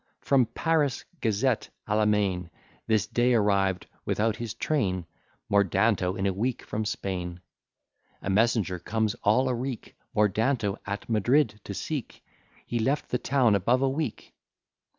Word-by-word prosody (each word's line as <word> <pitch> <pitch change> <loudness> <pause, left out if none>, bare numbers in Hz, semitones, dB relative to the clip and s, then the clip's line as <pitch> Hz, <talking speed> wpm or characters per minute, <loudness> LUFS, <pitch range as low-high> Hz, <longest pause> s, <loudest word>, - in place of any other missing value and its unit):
From 130 -4 +3
Paris 155 -3 0 0.2
gazette 115 +2 +1 0.2
à 105 - +1
la 110 0 +3
main, 95 -4 +1 0.4
This 110 -2 +2
day 120 +2 +2
arriv'd, 100 -4 +2 0.2
without 110 +1 0
his 115 -3 -5
train, 95 - 0 0.4
Mordanto 100 -1 +2
in 95 - -1
a 95 - +1
week 120 +6 -2
from 110 +1 -3
Spain. 90 -4 -3 0.8
A - - -5
messenger 100 -3 +2
comes 110 +3 0
all 125 +6 +3
a 130 - +1
reek 125 0 -5 0.2
Mordanto 105 +1 +1
at 100 +1 -4
Madrid 115 0 +2
to 100 - -5
seek; 145 0 -5 0.4
He 120 - -2
left 135 +6 0
the 125 - +1
town 130 -5 +3
above 120 +7 +2
a 135 - +3
week. 135 -3 -4
110 Hz, 145 wpm, -27 LUFS, 100-125 Hz, 0.8 s, From